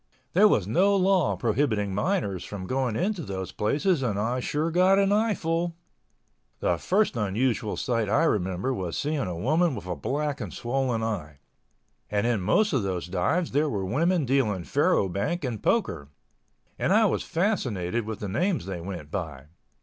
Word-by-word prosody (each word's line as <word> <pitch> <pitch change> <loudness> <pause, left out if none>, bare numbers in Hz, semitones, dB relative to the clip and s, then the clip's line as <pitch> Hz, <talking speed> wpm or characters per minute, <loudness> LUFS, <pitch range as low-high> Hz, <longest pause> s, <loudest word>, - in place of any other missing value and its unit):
There 205 +4 +6
was 105 - +2
no 190 - +3
law 190 -4 +3
prohibiting 110 -4 0
minors 105 - -1
from 100 -3 -6
going 130 +1 -1
into 190 - -1
those 95 - -5
places 150 - +1
and 115 -6 -1
I 115 +5 0
sure 150 +6 -1
got 185 +3 +4
an 200 0 +3
eyeful! 175 -6 0 0.8
The 85 -2 0
first 200 -4 +1
unusual 110 +1 0
sight 115 -5 -1
I 140 +9 +3
remember 95 - 0
was 90 -8 -3
seeing 150 +1 -1
a 90 -9 -3
woman 155 - +2
with 100 - -7
a 90 -1 -3
black 145 - -2
and - - -5
swollen 120 -2 -1
eye. 85 -10 -4 0.7
And 105 0 0
in 120 -4 +1
most 155 - +2
of 135 - +2
those 95 -3 -2
dives 95 - 0
there 150 +3 +2
were 100 -7 -2
women 165 - +1
dealing 120 -8 +1
faro 95 +5 +2
bank 100 - -2
and 120 -6 -3
poker—and 70 0 -3
I - - +5
was - - +1
fascinated 120 - -1
with 110 -2 -5
the 105 - -3
names 170 - 0
they 95 -3 -5
went 85 -5 -7
by. 75 -7 -5
120 Hz, 170 wpm, -26 LUFS, -, 0.8 s, There